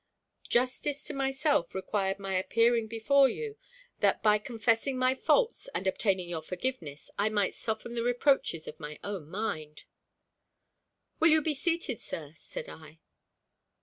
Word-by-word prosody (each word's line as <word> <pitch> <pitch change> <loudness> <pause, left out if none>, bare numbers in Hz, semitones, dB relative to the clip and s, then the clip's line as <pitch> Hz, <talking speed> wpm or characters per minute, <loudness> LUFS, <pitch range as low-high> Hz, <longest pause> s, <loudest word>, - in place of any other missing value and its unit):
"Justice 260 +3 +1
to - - -3
myself 270 - +1
required 195 0 -1
my 195 -1 -4
appearing 230 +5 +2
before 265 +5 +4
you, 445 - -5 0.4
that, - - +2
by 210 -1 +5
confessing 230 +3 0
my 255 0 +3
faults - - +1
and - - -2
obtaining 190 -1 +1
your 170 -2 -4
forgiveness, 175 - -5
I 205 +2 +3
might 205 -2 +1
soften 220 +1 -4
the 235 - -1
reproaches 245 - +1
of 155 - -8
my 150 0 -7
own 190 -7 -5
mind." 155 -6 -4 1.4
"Will 325 - +6
you 315 0 +6
be 315 - +1
seated, 295 - -1
sir?" 150 -2 -6
said 160 - -8
I. 160 0 -12
220 Hz, 145 wpm, -30 LUFS, 185-265 Hz, 1.4 s, Will